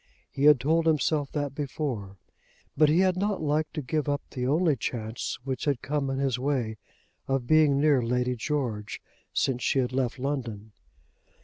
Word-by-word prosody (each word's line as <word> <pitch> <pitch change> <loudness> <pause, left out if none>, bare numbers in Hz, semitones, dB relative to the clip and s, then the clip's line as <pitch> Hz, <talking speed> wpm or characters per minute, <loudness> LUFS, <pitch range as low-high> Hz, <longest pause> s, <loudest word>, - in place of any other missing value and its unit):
He 140 - 0
had 150 -3 +7
told 160 +5 +2
himself 150 -2 +1
that 145 -2 -2
before, 130 -9 -4 0.6
but 155 0 +5
he 165 +4 +4
had 185 -1 +3
not 200 +1 0
liked 155 +1 -1
to 150 - -3
give 150 +3 -1
up 145 0 -1
the 125 -2 -2
only 155 +2 +3
chance 115 -2 -4
which 130 -1 -3
had 140 -4 0
come 140 -1 -1
in 135 - -2
his 135 -3 0
way 125 -5 -1 0.5
of 135 -2 0
being 150 0 +4
near 145 -3 +4
Lady 125 +1 0
George 120 -5 -3 0.3
since 125 -2 0
she - - +1
had 125 -1 +1
left 130 -1 -1
London. 120 -6 -4
135 Hz, 175 wpm, -27 LUFS, 125-150 Hz, 0.6 s, had